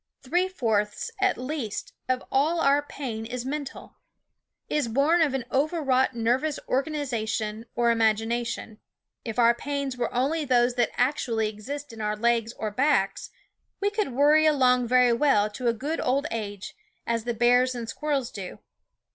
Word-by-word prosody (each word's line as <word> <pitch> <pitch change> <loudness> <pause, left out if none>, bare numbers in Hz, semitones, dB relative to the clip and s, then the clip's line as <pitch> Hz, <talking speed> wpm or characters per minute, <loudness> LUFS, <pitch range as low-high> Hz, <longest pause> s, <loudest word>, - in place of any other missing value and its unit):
Three 350 +8 +1
fourths, 220 - -1
at 390 0 +2
least, 255 -4 -4 0.2
of 255 0 0
all 305 +6 +2
our 285 -2 +4
pain 255 -6 -6
is 245 +2 -5
mental; 285 0 -6 0.7
is 300 -5 0
born 285 +9 +3
of 290 -4 +2
an 255 -3 -3
overwrought 270 -3 +1
nervous 250 +6 0
organiza 265 -5 -1
tion, 220 +1 -3
or 235 0 +3
imagination. 225 0 0 0.4
If 225 -1 -5
our 235 -1 +5
pains 280 +1 -3
were 245 - -1
only 285 +6 0
those 245 -3 +3
that 240 -2 +1
actually 240 -4 +1
exist 270 +6 -7
in 225 - -8
our 210 0 -1
legs 230 +1 +1
or 215 -1 -4
backs, 255 -4 +1 0.5
we 405 - +1
THE - - -19
WOODS - - -18
could 265 - -8
worry 300 +3 +5
along 250 -4 +3
very 250 0 +4
well 230 -5 +3
to 245 +4 -4
a - - +5
good 290 +8 -3
old 275 +3 +1
age, 205 -3 -5 0.3
as 230 -1 -1
the 240 -1 -2
bears 245 +2 +3
and 235 -2 -5
squirrels 280 -1 -2
do. 190 -3 -7
250 Hz, 165 wpm, -26 LUFS, 230-285 Hz, 0.7 s, our